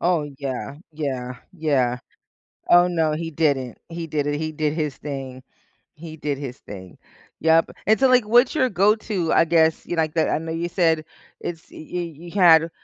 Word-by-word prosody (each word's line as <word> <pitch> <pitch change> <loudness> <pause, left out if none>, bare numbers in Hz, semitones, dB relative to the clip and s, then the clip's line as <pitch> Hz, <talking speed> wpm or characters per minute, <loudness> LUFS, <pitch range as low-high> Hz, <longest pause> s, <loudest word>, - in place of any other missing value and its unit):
Oh, 175 -3 +2 0.2
yeah, 140 0 -5 0.2
yeah, 130 -5 -4 0.2
yeah. 135 -7 0 0.7
Oh, 175 0 +6
no, 165 -3 +1
he 165 +1 -4
didn't, 140 -5 0
he 165 0 -6
did 145 -1 -1
it, 145 0 -1
he 155 0 -3
did 150 -1 -1
his 150 -4 -2
thing, 135 -3 -7 0.5
he 160 0 -9
did 145 -2 -3
his 135 -2 -7
thing, 95 -3 -11 0.4
yep. 160 0 +3 0.2
And 220 +3 +3
so, 265 - +5
like, 250 -3 +4
what's 245 +6 +4
your 260 -4 +2
go 200 +4 +3
to, 195 -7 -2
I - - +5
guess, 160 -1 +2
you 175 - -3
like 155 -1 0
that 160 - +2
I - - +1
know 160 +1 -5
you 170 +1 -3
said 165 -4 +1 0.4
it's 165 -2 -7
y - - -13 0.2
y 180 - -1
you 170 0 -7
had 170 -4 +5
160 Hz, 190 wpm, -22 LUFS, 145-175 Hz, 0.7 s, Oh